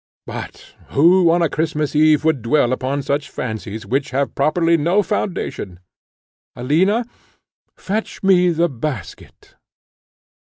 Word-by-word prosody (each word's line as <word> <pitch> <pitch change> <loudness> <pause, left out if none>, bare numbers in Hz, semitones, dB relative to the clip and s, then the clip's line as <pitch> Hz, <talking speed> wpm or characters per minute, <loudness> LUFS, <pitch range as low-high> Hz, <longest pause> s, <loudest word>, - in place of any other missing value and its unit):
But - - -9
who, 170 +4 +4
on 170 +1 +3
a - - +3
Christmas 155 -1 -2
Eve, 155 0 +4
would 160 -6 +2
dwell 120 +1 +2
upon 135 +2 -2
such 140 +2 -2
fancies, 110 -2 -6
which 135 +7 -1
have 135 +1 -1
properly 165 +4 +2
no 170 +6 +2
foundation? 175 - -4 0.8
Alina, 185 - +1 0.7
fetch 210 +2 -4
me 180 -2 +4
the 170 0 +1
basket." 130 - -7
155 Hz, 120 wpm, -19 LUFS, 130-175 Hz, 0.8 s, who